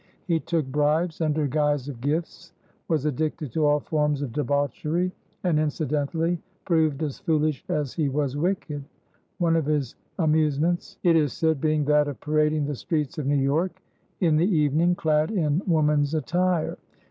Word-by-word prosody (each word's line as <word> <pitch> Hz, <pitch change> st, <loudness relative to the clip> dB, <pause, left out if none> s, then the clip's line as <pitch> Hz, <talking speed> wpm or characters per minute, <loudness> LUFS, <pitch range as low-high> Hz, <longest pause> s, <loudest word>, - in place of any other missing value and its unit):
He 170 Hz, -3 st, +1 dB
took 160 Hz, -2 st, -1 dB
bribes 150 Hz, +5 st, 0 dB
under 155 Hz, -1 st, +1 dB
guise 145 Hz, -1 st, 0 dB
of 130 Hz, -5 st, -7 dB
gifts, 155 Hz, +5 st, -3 dB, 0.3 s
was 155 Hz, -4 st, 0 dB
addicted 150 Hz, -1 st, -2 dB
to 150 Hz, +4 st, +2 dB
all 145 Hz, 0 st, +3 dB
forms 150 Hz, -3 st, 0 dB
of 125 Hz, -5 st, -5 dB
debauchery, 150 Hz, +5 st, 0 dB, 0.3 s
and 170 Hz, -4 st, +2 dB
incidentally 155 Hz, +2 st, -1 dB, 0.2 s
proved 160 Hz, -4 st, +1 dB
as 145 Hz, -3 st, -4 dB
foolish 155 Hz, -3 st, 0 dB
as 150 Hz, -6 st, -1 dB
he 155 Hz, -4 st, 0 dB
was 140 Hz, -1 st, -1 dB
wicked, 150 Hz, -3 st, -2 dB, 0.5 s
one 170 Hz, -3 st, +2 dB
of 160 Hz, -3 st, 0 dB
his 145 Hz, -5 st, 0 dB, 0.2 s
amusements, 160 Hz, 0 st, +1 dB
it 170 Hz, -2 st, +5 dB
is 150 Hz, -4 st, +2 dB
said, 160 Hz, -4 st, 0 dB
being 155 Hz, -2 st, +1 dB
that 150 Hz, 0 st, +3 dB
of 145 Hz, -, -5 dB
parading 150 Hz, 0 st, +1 dB
the 145 Hz, -, -2 dB
streets 150 Hz, +3 st, -2 dB
of 140 Hz, -, -3 dB
New 145 Hz, -, +2 dB
York 155 Hz, +7 st, 0 dB, 0.4 s
in 160 Hz, -4 st, +3 dB
the 175 Hz, +6 st, +2 dB
evening, 155 Hz, +4 st, +3 dB
clad 155 Hz, -2 st, +1 dB
in 165 Hz, -6 st, +1 dB
woman's 150 Hz, -3 st, +2 dB
attire. 175 Hz, +2 st, 0 dB
150 Hz, 160 wpm, -25 LUFS, 145-165 Hz, 0.5 s, it